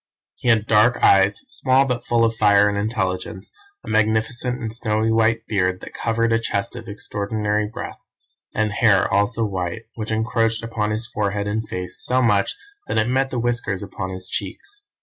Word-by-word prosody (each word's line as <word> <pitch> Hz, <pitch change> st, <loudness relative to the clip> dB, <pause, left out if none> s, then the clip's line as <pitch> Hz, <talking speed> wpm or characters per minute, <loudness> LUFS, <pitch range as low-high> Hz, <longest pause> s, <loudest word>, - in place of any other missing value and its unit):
He -, -, -7 dB
had 110 Hz, -3 st, +4 dB
dark 115 Hz, +3 st, +4 dB
eyes, 95 Hz, +1 st, +5 dB
small 135 Hz, -, +3 dB
but 125 Hz, -2 st, -2 dB
full 120 Hz, -1 st, +2 dB
of 115 Hz, 0 st, 0 dB
fire 105 Hz, -2 st, +5 dB
and 100 Hz, -, 0 dB
intelligence, 100 Hz, -2 st, -3 dB, 0.3 s
a -, -, -15 dB
magnificent 110 Hz, +3 st, +1 dB
and 110 Hz, -3 st, -4 dB
snowy 110 Hz, -1 st, 0 dB
white 115 Hz, 0 st, +2 dB
beard 90 Hz, -3 st, 0 dB
that -, -, -10 dB
covered 115 Hz, 0 st, 0 dB
a 115 Hz, -, +3 dB
chest 115 Hz, 0 st, -2 dB
of 115 Hz, -2 st, -8 dB
extraordinary 105 Hz, 0 st, -2 dB
breadth, -, -, -7 dB, 0.5 s
and 110 Hz, 0 st, 0 dB
hair 105 Hz, -2 st, +3 dB
also 110 Hz, +3 st, +1 dB
white, 95 Hz, +1 st, -3 dB
which 110 Hz, -1 st, -6 dB
encroached 115 Hz, 0 st, 0 dB
upon 110 Hz, -2 st, -2 dB
his 110 Hz, +2 st, -2 dB
forehead 105 Hz, -3 st, -2 dB
and 105 Hz, +1 st, -3 dB
face 90 Hz, 0 st, -3 dB
so 130 Hz, +1 st, +3 dB
much 105 Hz, -5 st, +2 dB, 0.3 s
that -, -, -2 dB
it 110 Hz, +2 st, +2 dB
met 135 Hz, +1 st, +1 dB
the 130 Hz, -, -4 dB
whiskers 120 Hz, -5 st, -1 dB
upon 95 Hz, -1 st, -5 dB
his 95 Hz, 0 st, -5 dB
cheeks. 255 Hz, -, -5 dB
110 Hz, 180 wpm, -22 LUFS, 100-115 Hz, 0.5 s, eyes